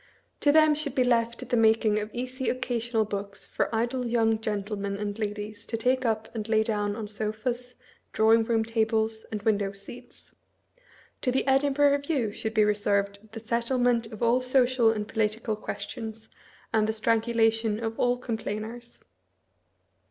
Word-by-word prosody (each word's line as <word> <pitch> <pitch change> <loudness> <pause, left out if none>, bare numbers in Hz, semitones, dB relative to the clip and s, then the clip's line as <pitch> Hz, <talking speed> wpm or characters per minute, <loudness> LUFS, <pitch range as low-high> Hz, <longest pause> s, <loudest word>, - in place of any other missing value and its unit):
To 290 - +4
them 310 0 +6
should 295 -3 -1
be 255 - +4
left 235 -1 0
the - - +1
making 220 -2 +3
of 210 0 -4
easy 255 +2 -3
occasional 240 -3 -1
books 200 -1 -5
for - - -1
idle 240 +3 -1
young 225 -2 +2
gentlemen 200 -2 -3
and 205 +1 -4
ladies 210 0 -5
to 225 - -2
take 255 +3 +1
up 220 -1 0
and 220 -1 -5
lay 220 -1 +4
down 210 -2 -1
on 220 -1 -5
sofas, 220 +4 -3 0.4
drawing 225 +1 +4
room 225 -1 +1
tables, 220 -1 0
and 210 -2 -4
window 205 -2 +1
seats; 240 +5 -10 0.9
to 250 - +1
the 260 - 0
Edinburgh 280 +1 +3
Review 280 -5 0
should 220 +1 -5
be 215 - +5
reserved 205 0 0
the 225 - -7
settlement 235 +1 +1
of 220 +1 -7
all 235 +2 +3
social 255 -2 +3
and. 210 -2 -1
political 220 0 -1
questions 220 +1 -6 0.4
and 215 -1 +3
the 220 - 0
strangulation 225 -1 +1
of 225 -1 -4
all 245 0 +2
complainers. 230 0 -5
225 Hz, 155 wpm, -27 LUFS, 215-245 Hz, 0.9 s, them